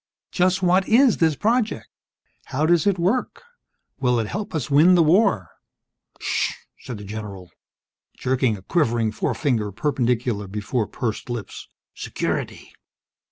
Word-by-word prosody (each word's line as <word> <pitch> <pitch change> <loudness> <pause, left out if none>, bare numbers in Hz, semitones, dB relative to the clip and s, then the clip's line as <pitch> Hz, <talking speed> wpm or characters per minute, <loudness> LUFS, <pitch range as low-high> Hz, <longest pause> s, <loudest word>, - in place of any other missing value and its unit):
"Just 185 +1 +1
what 185 +1 +3
is 245 +1 +5
this 160 -3 +2
project? 225 - 0 0.6
How 140 +3 -1
does 170 +2 +3
it 200 -2 +2
work? 195 - -1 0.6
Will 125 -2 +2
it 115 - -1
help 200 - -5
us 145 -3 -3
win 160 +6 +6
the 170 - +5
war?" 155 - +3 0.7
"Sssh!" - - -1 0.3
said 120 - -7
the 105 - -9
general, 100 -3 -8 0.7
jerking 130 -4 0
a 95 - -15
quivering 115 - +1
forefinger 110 -2 -1
perpendicular 120 -3 -1
before 105 +3 -2
pursed 120 -1 -4
lips. 120 -4 -6 0.3
"Security!" - - -4
130 Hz, 130 wpm, -23 LUFS, 110-180 Hz, 0.7 s, win